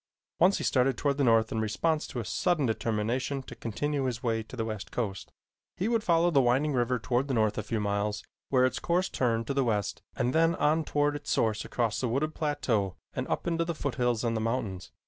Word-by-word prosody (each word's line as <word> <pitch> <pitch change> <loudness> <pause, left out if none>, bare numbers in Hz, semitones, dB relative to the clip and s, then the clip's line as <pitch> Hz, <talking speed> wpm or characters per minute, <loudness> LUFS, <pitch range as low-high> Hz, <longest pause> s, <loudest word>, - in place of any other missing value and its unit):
Once 185 +4 +5
he - - -4
started 130 0 +2
toward 140 -1 0
the - - +3
north 115 -2 +4
in 110 - -1
response 155 +9 0
to 125 - -5
a 115 - -4
sudden 170 - +1
determination 115 +4 -1
to - - -10
continue 140 +5 -2
his 120 -2 -3
way 115 -2 0
to 110 - -10
the 115 -3 -2
west 110 -2 -5
coast. 100 -6 -3 0.5
He 190 - 0
would 230 -2 +1
follow 170 0 +3
the 140 -4 +5
winding 135 +4 +2
river 125 0 +1
toward 125 +3 0
the 135 - -1
north 110 -2 +2
a - - -1
few 110 +1 -2
miles 105 0 -1 0.3
where 130 -1 +4
its 130 - -1
course 180 +2 +1
turned 115 -3 0
to 140 - -2
the 135 0 +2
west 105 -4 -1
and 125 -1 0
then 165 +1 +3
on 155 +1 +2
toward 145 0 +1
its 145 - -6
source 110 -2 +1
across 115 -3 -1
a 125 - 0
wooded 140 +6 0
plateau 125 - 0 0.2
and - - -3
up - - -2
into 165 -1 +1
the 170 0 -3
foothills 125 -5 -1
and 115 -1 0
the 110 - -1
mountains. 110 -5 -3
125 Hz, 225 wpm, -29 LUFS, 110-145 Hz, 0.5 s, Once